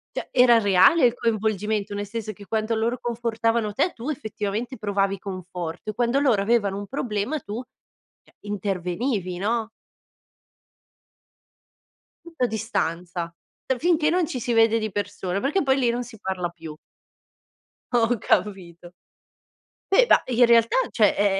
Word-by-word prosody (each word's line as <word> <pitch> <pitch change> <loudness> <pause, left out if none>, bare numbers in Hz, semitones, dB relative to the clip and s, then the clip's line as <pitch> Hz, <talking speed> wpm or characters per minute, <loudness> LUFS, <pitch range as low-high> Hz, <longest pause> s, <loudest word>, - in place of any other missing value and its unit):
Cioè, - - -4
era 245 -2 +6
reale 205 - +5
il 240 - +4
coinvolgimento, 215 -3 -1
nel 205 0 -4
senso 220 0 -5
che 200 0 -13
quanto 220 +2 -1
loro 230 +3 -1
confortavano 230 -2 -1
te, 320 - +1
tu, 240 +6 -6
effettivamente, 220 -1 -4
provavi 200 -2 0
conforto, 180 -1 -6
e - - -2
quando 240 +4 +1
loro 250 -8 +3
avevano 205 -2 +1
un 200 0 -6
problema 245 +3 -2
tu, 215 -1 -6 0.6
cioè, - - -27
intervenivi, 195 0 -2
no? 220 +3 -1 2.6
Tutto 325 -7 -2
a - - 0
distanza, 175 -6 -3 0.3
uhm, 260 - +1
finché 320 -2 +2
non 355 0 +2
ci 260 - -4
si 240 0 -2
vede 225 0 +4
di 215 -1 -3
persone 200 -2 -3
perché, 295 +9 +1
poi, 270 -2 +2
lì 250 -3 +2
non 240 +1 -1
si 230 -2 -12
parla 185 -2 -2
più. 165 -2 -10 1.2
Ho 235 +1 +3
capito. 180 -5 -2 1.0
E, - - +6
da - - +5
in 245 -1 +4
realtà, 230 -1 +4
cioè, 210 -4 +3
è 200 -1 +2
220 Hz, 145 wpm, -24 LUFS, 195-240 Hz, 2.6 s, era